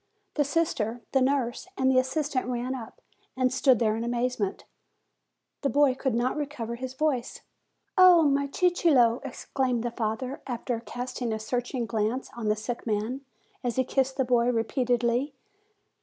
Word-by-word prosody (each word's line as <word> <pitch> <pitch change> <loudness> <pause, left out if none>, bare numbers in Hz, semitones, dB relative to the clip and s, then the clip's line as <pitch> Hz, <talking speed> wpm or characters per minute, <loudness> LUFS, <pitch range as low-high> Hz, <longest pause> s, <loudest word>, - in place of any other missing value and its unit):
The 295 - +2
sister, 270 -7 -1
the 265 - +3
nurse, 260 +2 0
and 260 0 +3
the 255 - +5
assistant 265 0 -1
ran 250 +1 -2
up, 240 -4 -8 0.4
and 255 -1 +2
stood 265 -2 +4
there 220 -2 +1
in 225 - -3
amazement. 240 -4 -1 1.0
The 275 - +1
boy 285 -1 +4
could 265 -2 -1
not 245 +2 +1
recover 285 -6 -4
his 255 +2 -6
voice. 270 -4 -1 0.6
"Oh, 360 -3 +8
my 280 -1 +2
Cicillo!" 280 -8 +3
exclaimed 255 -2 -2
the 240 - -2
father, 235 +4 -3
after 240 -1 -2
cast 245 +2 -6
ing 240 -2 -1
a 220 - -1
searching 245 +3 -2
glance 225 +3 -2
on 235 -2 -4
the 210 - +3
sick 235 +3 -5
man, 220 +5 -1 0.4
as 245 -2 -1
he 260 - +2
kissed 265 +1 0
the 265 - +2
boy 245 -1 +3
repeatedly. 245 +2 0
250 Hz, 160 wpm, -27 LUFS, 235-270 Hz, 1.0 s, Oh